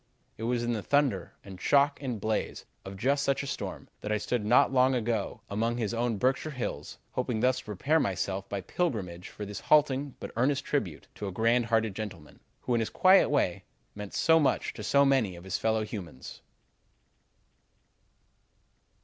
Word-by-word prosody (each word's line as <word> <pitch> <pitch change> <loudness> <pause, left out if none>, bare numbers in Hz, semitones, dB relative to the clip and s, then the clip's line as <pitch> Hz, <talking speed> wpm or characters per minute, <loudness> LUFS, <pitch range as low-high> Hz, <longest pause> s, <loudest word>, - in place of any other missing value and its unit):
"It 115 - -5
was 120 -1 0
in 120 0 0
the 110 - -2
thunder 135 - 0
and 95 -2 -11
shock 140 0 +3
and 125 -6 -3
blaze 110 +1 -2 0.2
of 95 0 -8
just 140 +7 +1
such 140 0 0
a - - -5
storm 140 - -5
that 105 - -5
I 105 - +2
stood 115 +2 -2
not 120 +5 +4
long 130 0 +4
ago 115 -4 -2
among 115 +4 -1
his 115 -2 -2
own 115 -1 0
Berkshire 130 +7 0
Hills, 130 -5 -5
hoping 125 -3 -2
thus 130 +1 +2
to - - -12
prepare 135 - +1
myself 95 - -2
by 100 -1 -3
pilgrimage 95 - -3
for 105 - -7
this 100 0 -6
halting 145 -2 +2
but - - -7
earnest 135 +4 +1
tribute 105 - -2
to 105 - -6
a - - -4
great 115 +5 +2
hearted 110 -3 +1
gentleman, 95 -8 -7 0.2
who, 125 - -1
in 120 - +3
his 115 - -1
quiet 190 +1 +5
way, 140 -12 0 0.3
meant 105 -1 -8
so 165 0 +4
much 145 - +1
to - - -8
so 140 +6 +4
many 130 -9 +2
of 85 - -11
his 95 -2 -3
fellow 110 -1 +1
humans." 90 - -8
115 Hz, 185 wpm, -29 LUFS, 100-135 Hz, 0.3 s, quiet